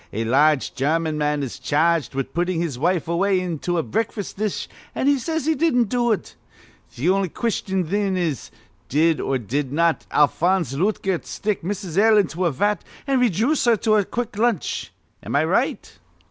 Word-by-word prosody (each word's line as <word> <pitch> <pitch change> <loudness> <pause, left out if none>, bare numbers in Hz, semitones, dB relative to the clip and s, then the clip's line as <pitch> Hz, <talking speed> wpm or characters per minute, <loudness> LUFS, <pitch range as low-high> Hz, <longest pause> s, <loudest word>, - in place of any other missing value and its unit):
A 110 - -2
large 145 +4 +3
German 155 +4 0
man 150 -1 0
is 130 - -6
charged 160 -1 +1
with 135 -1 -3
puttin' 175 0 0
his 155 -8 -3
wife 170 +2 +1
away 185 +3 +2
into 175 -1 -2
a 165 - +1
breakfas' 215 0 -3
dish, 210 0 -2 0.3
an' - - -1
he 280 -1 +3
says 320 +3 -2
he 320 - +3
didn't 255 -8 +2
do 240 -1 +1
it. 215 - -3 0.5
Th' 135 +8 -4
on'y 190 0 +2
question, 190 -3 -1
thin, 195 +2 0
is 165 -7 -2 0.4
Did 160 +3 +2
or 135 - 0
did 130 +4 -3
not 165 +2 +1
Alphonse 170 +1 +2
Lootgert 190 +2 -1
stick 210 -1 -2
Mrs. 185 -1 -3
L. 220 +1 +5
into 180 -2 +1
a 170 - +2
vat, 205 +10 0 0.2
an' 270 -2 +1
rayjooce 245 - +2
her 235 -2 +5
to 215 +1 +1
a 205 - +3
quick 235 +1 -4
lunch? 230 -7 0 0.3
Am - - -4
I - - +3
right?" - - -1
180 Hz, 180 wpm, -22 LUFS, 155-215 Hz, 0.5 s, L